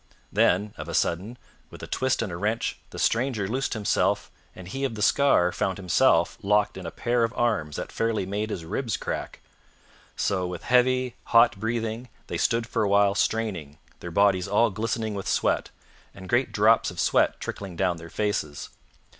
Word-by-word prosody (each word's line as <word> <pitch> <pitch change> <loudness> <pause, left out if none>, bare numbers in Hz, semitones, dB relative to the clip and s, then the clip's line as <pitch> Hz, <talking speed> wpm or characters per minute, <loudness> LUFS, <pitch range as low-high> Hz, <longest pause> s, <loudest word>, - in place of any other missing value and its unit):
Then, 100 +3 +2
of - - -7
a - - -3
sudden, 100 +9 -1 0.3
with - - -12
a - - -6
twist 130 -2 0
and 105 - -4
a - - -4
wrench, 105 +5 -2
the - - -10
stranger 115 -4 0
loosed 130 +4 -2
himself, 100 -2 0 0.2
and 95 -1 -10
he 135 +9 -5
of 130 -5 -1
the 105 - -2
scar 105 -9 +4
found 95 +1 -2
himself 90 -3 +2
locked 105 0 +2
in 95 -3 -7
a - - -2
pair 120 +7 0
of 115 - 0
arms 100 -11 0
that - - -5
fairly 115 -4 -1
made 105 +3 -3
his 85 -6 -5
ribs 115 +7 -2
crack. - - -5 0.7
So, 95 -2 0
with 90 -1 -6
heavy, 125 0 +2
hot 115 -3 +4
breathing, 115 +2 -3 0.2
they - - -4
stood 115 0 +1
for - - -2
a 105 - +1
while 100 0 +4
straining, 100 -10 -1 0.2
their 85 - -7
bodies 95 +1 +2
all 105 +3 +3
glistening 110 +1 -2
with 100 -1 -5
sweat, - - +1 0.5
and 95 -1 -10
great 120 +5 +1
drops 110 +2 +4
of - - -9
sweat - - +2
trickling 95 -3 -6
down 90 -1 0
their 85 0 -10
faces. 90 -9 -2
105 Hz, 185 wpm, -26 LUFS, 95-115 Hz, 0.7 s, scar